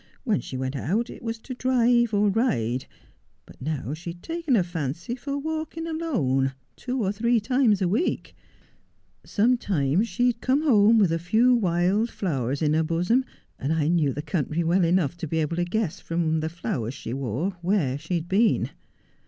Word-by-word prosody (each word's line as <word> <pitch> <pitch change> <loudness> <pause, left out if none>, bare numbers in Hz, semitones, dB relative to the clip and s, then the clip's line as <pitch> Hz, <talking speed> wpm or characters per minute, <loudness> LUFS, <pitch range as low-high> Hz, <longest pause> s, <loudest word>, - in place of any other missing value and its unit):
When 220 -7 +1
she 130 - -6
went 130 +1 -3
out 205 - -1
it - - -11
was 230 -1 -3
to 255 - -7
drive 245 -2 +2
or 205 0 +3
ride, 130 - 0 0.6
but - - -17
now 145 -1 -3
she 165 +3 -7
had 175 - -19
taken 330 -5 0
a 195 - +3
fancy 170 - -4
for 280 +3 -4
walking 315 +2 -4
alone, 160 - 0 0.2
two 250 -2 -3
or 195 - +1
three 235 +3 +2
times 225 -3 +2
a - - +2
week. 220 - -1 0.9
Sometimes 205 - +1
she 245 - 0
would 240 -2 +1
come 270 +4 +2
home 225 -6 +5
with 195 -6 +4
a 165 - 0
few 220 +9 +3
wild 195 +1 +2
flowers 140 - -2
in 150 0 +2
her 160 - +3
bosom, 180 +11 +1 0.3
and 140 - -2
I 160 -1 +1
knew 165 -5 +2
the 145 +3 -5
country 160 +1 -1
well 175 +3 +2
enough 170 -2 +1
to 165 - -5
be 160 - -2
able 160 +1 -1
to 175 - +1
guess 190 -1 -2
from 165 -1 -1
the 160 +1 -2
flowers 135 -7 -4
she 120 - -6
wore 135 - -2
where 175 -8 +1
she 165 +4 -3
had 170 0 -2
been. 210 +5 +2
180 Hz, 185 wpm, -25 LUFS, 155-235 Hz, 0.9 s, home